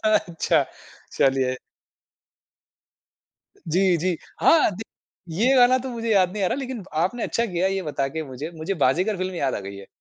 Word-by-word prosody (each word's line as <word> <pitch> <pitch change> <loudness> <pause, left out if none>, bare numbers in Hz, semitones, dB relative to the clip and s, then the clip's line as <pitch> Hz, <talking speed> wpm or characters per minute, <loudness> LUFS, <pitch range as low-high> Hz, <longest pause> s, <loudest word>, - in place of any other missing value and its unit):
अच्छा 185 -6 +2 0.5
चलिए। 130 -1 +2 2.1
जी, 180 +2 +3
जी। 175 +1 -1 0.2
हाँ, 325 -7 +5
दि 215 - -6 0.6
ये 265 +2 +4
गाना 250 +1 +6
तो 260 +1 -6
मुझे 230 -2 -3
याद 185 -3 +4
नहीं 210 -1 -3
आ - - +3
रहा, 215 - 0
लेकिन 260 -5 -5
आपने 185 +9 -1
अच्छा 235 - 0
किया 180 -1 0
ये 195 0 -2
बता 145 -4 -2
के 160 +3 -4
मुझे। 140 +4 -7
मुझे 160 +5 -3
"बाज़ीगर" 180 +8 +1
फ़िल्म 185 0 -3
याद 140 -6 -1
आ - - -3
गई 100 0 -7
है। 100 0 -11
185 Hz, 175 wpm, -24 LUFS, 155-220 Hz, 2.1 s, गाना